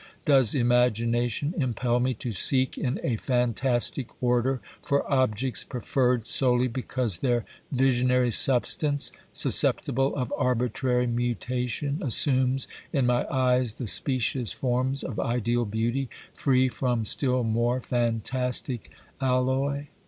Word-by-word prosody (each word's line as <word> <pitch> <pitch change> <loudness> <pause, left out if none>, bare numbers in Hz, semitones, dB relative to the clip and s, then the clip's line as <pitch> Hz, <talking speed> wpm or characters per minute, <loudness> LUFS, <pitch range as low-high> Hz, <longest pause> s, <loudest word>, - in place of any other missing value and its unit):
Does 135 -6 +4
imagination 120 - +1
impel 125 -2 0
me 130 +1 0
to 115 +1 -5
seek 130 +5 +3
in 125 - -2
a 120 -4 -1
fantastic 125 +1 0
order 125 +1 +1 0.2
for 140 0 0
objects 130 -3 0
preferred 125 -1 -1
solely 125 0 +2
because 125 -5 -2
their 120 -1 0 0.3
visionary 125 -2 +2
substance, 140 +4 +2 0.2
susceptible 135 +2 +2
of 125 -4 -3
arbitrary 125 0 0
mutation, 125 - -2
assumes 130 -2 +2 0.2
in 135 -5 +1
my 120 0 +1
eyes 125 -4 +1
the 125 - -5
specious 125 0 0
forms 130 +4 -1
of 120 - -5
ideal 120 0 0
beauty, 115 +5 -2 0.2
free 130 -2 +2
from 125 -3 -1
still 125 +1 0
more 120 +2 0
fantastic 125 0 -2 0.3
alloy 135 +2 0
125 Hz, 115 wpm, -26 LUFS, 120-130 Hz, 0.3 s, Does